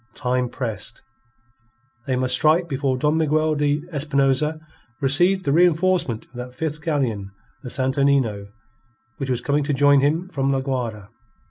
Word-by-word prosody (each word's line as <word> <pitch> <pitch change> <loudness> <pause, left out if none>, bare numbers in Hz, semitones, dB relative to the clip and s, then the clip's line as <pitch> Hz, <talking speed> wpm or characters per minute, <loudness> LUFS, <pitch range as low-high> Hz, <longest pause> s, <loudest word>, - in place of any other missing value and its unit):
Time 125 -2 -1
pressed. 115 -8 -4 1.0
They 130 - 0
must 130 0 +2
strike 165 +3 +4
before 135 -3 -1
Don 150 +3 +1
Miguel 155 0 +1
de 145 0 0
Espinosa 145 +1 +1 0.4
received 175 +7 +2
the - - +1
reenforcement 175 -6 +2
of - - -35
that 125 0 -8
fifth 155 0 -4
galleon, 130 -11 -2 0.3
the 130 - -7
Santo 130 +2 0
Nino, 120 -8 +1 0.7
which 135 -2 -4
was 125 -1 -1
coming 145 +3 0
to 145 +1 -1
join 145 +1 +5
him 155 +6 0
from 140 -5 -1
La 135 -1 0
Guayra. 120 -7 -4
140 Hz, 150 wpm, -22 LUFS, 130-155 Hz, 1.0 s, join